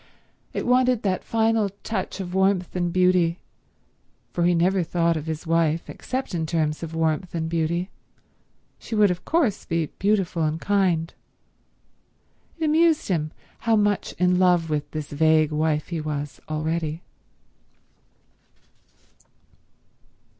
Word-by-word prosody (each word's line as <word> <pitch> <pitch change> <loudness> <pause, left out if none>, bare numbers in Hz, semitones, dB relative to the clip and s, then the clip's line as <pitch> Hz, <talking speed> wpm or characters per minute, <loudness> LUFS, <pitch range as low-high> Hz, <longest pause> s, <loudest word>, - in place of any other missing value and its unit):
It - - -3
wanted 250 -1 +3
that 190 -3 0
final 225 -2 +1
touch 200 -3 -3
of 180 -2 -5
warmth 190 -1 +1
and 175 -1 0
beauty, 180 -2 +3 0.9
for 175 - 0
he 175 0 +3
never 185 +3 +2
thought 170 0 +1
of 155 0 -4
his 160 +1 -4
wife 165 -1 +1
except 260 -4 -4
in 160 -2 -1
terms 155 -2 -1
of 165 -1 -6
warmth 165 +2 -1
and 160 -1 -1
beauty—she 170 +6 -6
would 210 -3 +5
of 180 0 -4
course 295 - +1
be 165 -1 -1
beautiful 195 -4 +1
and 155 +1 0
kind. 180 -5 +1 1.4
It 325 - -1
amused 315 -2 +3
him 155 -4 0 0.3
how 225 -1 +2
much 205 -1 +1
in 180 0 +2
love 175 -3 +3
with 150 -1 -1
this 155 -2 -5
vague 155 +1 +3
wife 155 0 0
he 170 -3 -3
was 145 -3 -5
already. 155 +1 -2
170 Hz, 130 wpm, -24 LUFS, 160-195 Hz, 1.4 s, would